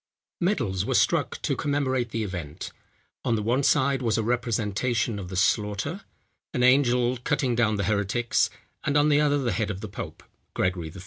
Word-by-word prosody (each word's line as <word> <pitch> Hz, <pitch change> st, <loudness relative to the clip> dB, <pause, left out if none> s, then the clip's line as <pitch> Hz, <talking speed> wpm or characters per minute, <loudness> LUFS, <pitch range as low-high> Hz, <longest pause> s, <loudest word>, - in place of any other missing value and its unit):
Medals 120 Hz, -, 0 dB
were -, -, -1 dB
struck -, -, +2 dB
to -, -, 0 dB
commemorate 130 Hz, -4 st, 0 dB
the 115 Hz, 0 st, -2 dB
event. 85 Hz, -7 st, -6 dB, 0.5 s
On 115 Hz, -, +1 dB
the 105 Hz, -, -2 dB
one 120 Hz, +5 st, +1 dB
side 135 Hz, 0 st, +2 dB
was 115 Hz, -3 st, +1 dB
a 110 Hz, -, 0 dB
representation 115 Hz, -1 st, 0 dB
of 90 Hz, -2 st, -7 dB
the 95 Hz, -, -6 dB
slaughter, 105 Hz, -, 0 dB, 0.5 s
an 125 Hz, -, +1 dB
angel 125 Hz, -1 st, +4 dB
cutting 135 Hz, 0 st, 0 dB
down 115 Hz, -2 st, +2 dB
the 100 Hz, -, -1 dB
heretics, 105 Hz, +4 st, +1 dB, 0.3 s
and 140 Hz, -, +1 dB
on 145 Hz, +1 st, +4 dB
the 145 Hz, 0 st, +4 dB
other, 145 Hz, -1 st, +3 dB
the 130 Hz, -4 st, 0 dB
head 110 Hz, -2 st, -1 dB
of 95 Hz, -3 st, -4 dB
the 110 Hz, -, -6 dB
pope, 100 Hz, -, -8 dB, 0.3 s
Gregory 90 Hz, -3 st, -1 dB
XIII. 95 Hz, -, -11 dB
120 Hz, 185 wpm, -26 LUFS, 105-130 Hz, 0.5 s, angel